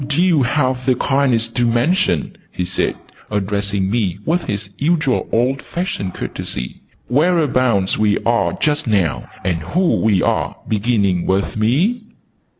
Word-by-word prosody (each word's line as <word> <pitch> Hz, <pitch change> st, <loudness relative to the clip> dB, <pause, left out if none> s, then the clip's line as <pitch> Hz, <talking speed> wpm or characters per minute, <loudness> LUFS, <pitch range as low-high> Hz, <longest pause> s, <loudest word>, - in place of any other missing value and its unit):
"Would 140 Hz, +1 st, -3 dB
you 175 Hz, -4 st, +4 dB
have 130 Hz, 0 st, 0 dB
the 130 Hz, -, +4 dB
kindness 130 Hz, -4 st, +1 dB
to 120 Hz, +1 st, -1 dB
mention," 120 Hz, -, +1 dB, 0.2 s
he 90 Hz, -, -3 dB
said, 95 Hz, +1 st, -1 dB, 0.3 s
addressing 100 Hz, -1 st, -1 dB
me 100 Hz, -6 st, 0 dB
with 175 Hz, +2 st, +1 dB
his 100 Hz, -1 st, -4 dB
usual 150 Hz, -3 st, +1 dB
old 130 Hz, +4 st, +1 dB
fashioned 170 Hz, -, -4 dB
courtesy, 60 Hz, -, -4 dB, 0.3 s
"whereabouts 130 Hz, -, +2 dB
we 105 Hz, -1 st, +3 dB
are 115 Hz, 0 st, +2 dB
just 150 Hz, -2 st, 0 dB
now 85 Hz, -, 0 dB, 0.2 s
and 90 Hz, -3 st, +1 dB
who 175 Hz, -, +1 dB
we 105 Hz, -4 st, +2 dB
are, -, -, 0 dB
beginning 100 Hz, -5 st, +1 dB
with 95 Hz, +1 st, 0 dB
me?" 150 Hz, -, +1 dB
120 Hz, 140 wpm, -18 LUFS, 100-145 Hz, 0.3 s, you